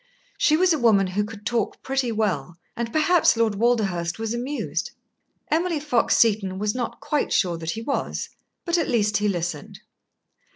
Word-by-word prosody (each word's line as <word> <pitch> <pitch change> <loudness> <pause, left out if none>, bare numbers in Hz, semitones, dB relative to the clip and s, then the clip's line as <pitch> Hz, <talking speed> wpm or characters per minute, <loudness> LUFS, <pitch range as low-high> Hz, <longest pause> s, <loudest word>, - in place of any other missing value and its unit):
She 310 - +4
was 360 0 +4
a 310 - -1
woman 215 -5 +4
who 190 +3 -1
could 210 0 -9
talk 230 -3 -2
pretty 265 -2 -1
well, 180 -8 -2 0.2
and 235 -1 -3
perhaps 315 -3 +3
Lord 225 -2 +2
Walderhurst 200 -6 0
was 225 0 -3
amused. 255 +5 -3 0.6
Emily 335 0 +1
Fox 285 -5 +2
Seton 200 -4 +2
was 210 +1 -1
not 245 -2 -4
quite 295 - -1
sure 180 -4 +2
that 160 -1 -5
he 225 - -5
was, 275 - -3 0.4
but 345 0 +1
at 325 - -1
least 210 -4 +2
he 210 - 0
listened. 175 -6 -3
225 Hz, 170 wpm, -24 LUFS, 200-270 Hz, 0.6 s, She